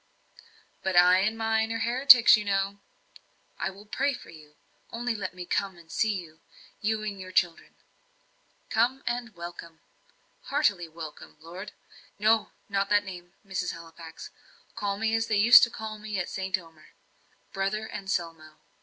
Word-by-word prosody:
"But 190 -1 -2
I 180 +1 +7
and 215 +3 0
mine 225 0 0
are 230 - -1
heretics, 250 +1 +7
you 210 - -2
know!" 200 0 -1 0.8
"I - - -1
will 195 +2 -13
pray 275 +6 -1
for - - -13
you. 150 -2 -16 0.3
Only 240 +1 -2
let 195 -4 -5
me 180 -1 -7
come 190 0 -2
and 165 -1 -16
see 220 -2 +1
you 165 -4 -9 0.4
you 215 +1 -1
and 205 -2 -5
your 185 0 -9
children." 175 -2 0 1.0
"Come, 260 +3 +1
and 240 -2 -3
welcome." 170 -1 -9 0.7
"Heartily 205 - +1
welcome, 160 -2 -10
Lord 170 +4 -9 0.2
" - - -24
"No 220 -1 +3 0.2
not 200 -1 -1
that 205 0 +4
name, 175 -2 -9
Mrs. 190 -2 -3
Halifax. 165 0 -11 0.4
Call 200 -1 -2
me 220 +1 0
as 225 0 +1
they 215 -2 +1
used 230 +4 +9
to - - -9
call 220 -2 -7
me 210 -1 -5
at 180 - -2
St. 190 0 -2
Omer 165 -3 -17 0.6
Brother 205 +3 -2
Anselmo." 165 -5 -4
195 Hz, 160 wpm, -27 LUFS, 175-220 Hz, 1.0 s, used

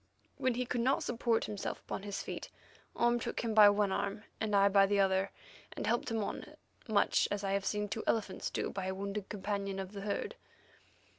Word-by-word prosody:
When 255 -2 +1
he 250 +1 -1
could 240 0 -1
not 260 +3 +2
support 235 -1 +1
himself 205 -2 -4
upon - - -5
his 200 0 -4
feet, - - -6 0.5
Orme 240 0 +3
took - - -3
him 230 -2 -1
by 210 -1 +9
one 205 -1 +2
arm, 200 +2 -2 0.2
and 215 -2 0
I 200 0 +6
by 195 0 +5
the 205 0 +2
other, 190 0 +3 0.4
and - - -4
helped 235 +2 +1
him 225 -2 0
on, - - -6 0.3
much 210 -3 +3
as 205 0 -2
I 195 - 0
have 195 0 0
seen 210 +1 0
two 205 +2 -4
elephants 210 -4 0
do - - -2
by 190 -1 -3
a 190 - -2
wounded 200 +1 -4
companion 200 -1 -3
of 190 -1 -5
the 200 -1 -7
herd. 200 0 -2
205 Hz, 210 wpm, -33 LUFS, 195-220 Hz, 0.5 s, by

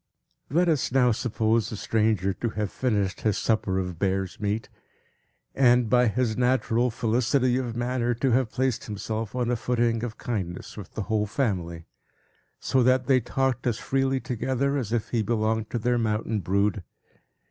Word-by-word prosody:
Let 175 +5 +2
us 155 -7 +1
now 125 -1 +4
suppose 115 -1 0
the - - -5
stranger 105 -3 +1
to 115 +5 -3
have 105 -2 -3
finished 105 -7 -1
his 105 -2 +1
supper 105 -4 0
of 90 -3 -3
bear's 95 -1 -1
meat; 105 +1 -2 0.9
and, 125 -3 +4
by 125 -1 +5
his 110 0 0
natural 125 -1 +2
felicity 125 +2 +1
of 120 -3 -3
manner, 120 0 0
to 130 +2 0
have 125 -1 +2
placed 130 +1 -1
himself 110 +1 -4
on 125 -1 0
a - - +2
footing 115 -1 0
of 115 -2 -5
kindness 95 -7 -4
with 105 -3 -10
the 110 - -2
whole 105 0 0
family, 90 -9 -2 0.7
so 130 - +1
that 130 +1 +3
they 130 -1 +4
talked 130 +1 -1
as 115 -2 0
freely 135 0 0
together, 130 +3 -1
as 120 -7 -2
if 115 -2 -1
he 115 - 0
belonged 110 0 0
to - - -2
their 120 +1 +1
mountain 110 0 -1
brood. 100 +3 0
115 Hz, 170 wpm, -26 LUFS, 105-125 Hz, 0.9 s, by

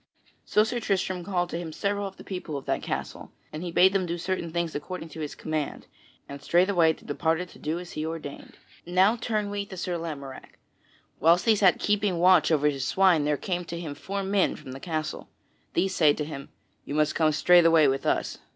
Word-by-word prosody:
So 210 - +3
Sir 240 +2 -2
Tristram 185 -4 -1
called 175 -1 -1
to 165 - -3
him 170 -2 -6
several 200 +4 -2
of 190 - -11
the - - -11
people 180 -6 -5
of 135 - -8
that - - -1
castle, - - -5 0.2
and 155 - -5
he 175 -1 -4
bade 185 +3 +5
them 190 -2 0
do 170 +1 -2
certain 175 -1 -3
things 170 -1 -2
according 165 +3 -6
to 160 - -10
his 150 -2 -5
command, 155 -2 -4 0.4
and 140 0 -9
straightway 175 -2 +3
they - - -18
departed 165 +4 -1
to - - -16
do 155 +2 -2
as 175 0 -8
he 155 - -4
ordained. 160 -3 -7 0.3
Now 185 +5 +3
turn 215 -3 -2
we 205 0 -2
to 190 - -9
Sir 175 -1 -3
Lamorack: 140 -5 -8 0.6
whilst 170 +4 +4
he 225 -2 +5
sat 195 -3 +4
keeping 205 -3 0
watch 180 0 +5
over 150 -2 +2
his 135 -3 -1
swine 185 -6 +3
there 150 -1 +1
came 180 +2 -3
to 170 0 -6
him 160 -4 -5
four 195 +6 -4
men 195 0 +1
from 140 -4 -10
the 135 - -8
castle. 155 -1 -4 0.5
These 190 +2 +1
say 155 -5 +4
to 150 - -4
him, 140 -2 -8 0.3
"You 145 - -5
must 155 0 +2
come 155 -2 +2
straightway 165 0 +5
with 135 0 0
us." - - -1
170 Hz, 215 wpm, -26 LUFS, 155-190 Hz, 0.6 s, bade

